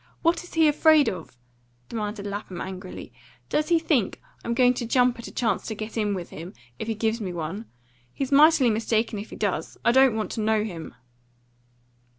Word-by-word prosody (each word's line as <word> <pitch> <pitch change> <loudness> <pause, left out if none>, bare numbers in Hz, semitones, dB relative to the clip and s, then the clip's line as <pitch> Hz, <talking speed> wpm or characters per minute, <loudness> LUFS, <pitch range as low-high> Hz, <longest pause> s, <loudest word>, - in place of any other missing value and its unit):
What 335 +1 +2
is 355 - -13
he 320 -1 +5
afraid 305 0 +5
of?" 165 -9 -8 0.5
demanded 210 -2 -4
Lapham 200 -3 -5
angrily. 185 0 -7 0.4
"Does 305 +2 0
he 340 - +5
think 305 - 0 0.2
I'm 235 - -2
going 250 0 +5
to 240 - -4
jump 245 0 +3
at 235 - -7
a - - -9
chance 225 -6 -1
to 220 - -3
get 215 +1 -6
in 210 -3 0
with 175 -2 -6
him, 170 +5 -9 0.2
if 220 - -4
he 225 - -1
gives 220 +2 -1
me 190 -3 -3
one? 175 +6 -5 0.4
He's 270 - -4
mightily 290 -3 +6
mistaken 220 0 0
if 210 - -8
he - - -9
does. 190 -6 -2
I - - +6
don't 265 -2 +5
want 215 -1 -2
to 220 - -3
know 215 0 +2
him." 175 -7 -7
220 Hz, 195 wpm, -25 LUFS, 200-260 Hz, 0.5 s, mightily